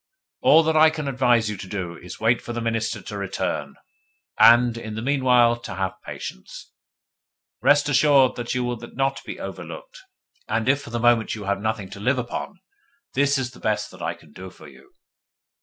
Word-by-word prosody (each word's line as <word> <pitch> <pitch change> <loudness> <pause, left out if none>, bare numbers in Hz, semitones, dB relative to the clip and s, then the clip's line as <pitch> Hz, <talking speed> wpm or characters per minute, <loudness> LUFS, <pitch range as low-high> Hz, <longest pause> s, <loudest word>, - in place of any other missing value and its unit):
All 165 - +6
that 160 0 0
I 155 0 +7
can 155 -2 -5
advise 125 -4 +2
you 105 - -3
to 95 - -8
do 90 -3 -5
is 90 +2 -10
wait 115 +2 +2
for 120 - -6
the 120 - -3
Minister 115 -1 -2
to 105 - -7
return, 75 -7 -3 0.6
and, 120 0 +6
in 110 -2 -7
the 110 - -4
meanwhile, 125 -3 +3
to 120 - -8
have 95 -1 -3
patience. 60 - -9 0.9
Rest 145 0 +4
assured 140 -2 +4
that 120 -1 -5
then - - -3
you 125 - 0
will 120 0 -2 0.2
not 135 0 -1
be - - -7
overlooked. - - -8 0.5
And 110 - -1
if 140 +2 +3
for 140 - -10
the 120 0 -3
moment 120 -2 +2
you 105 - -7
have 100 0 -1
nothing 110 -3 -3
to - - -9
live 130 +6 +1
upon, 125 - -5 0.5
this 140 0 +2
is 130 -2 -3
the - - -15
best 110 -1 -1
that - - -13
I - - -2
can - - -20
do 95 0 -9
for 80 -4 -15
you. 70 -2 -18
120 Hz, 200 wpm, -23 LUFS, 105-135 Hz, 0.9 s, I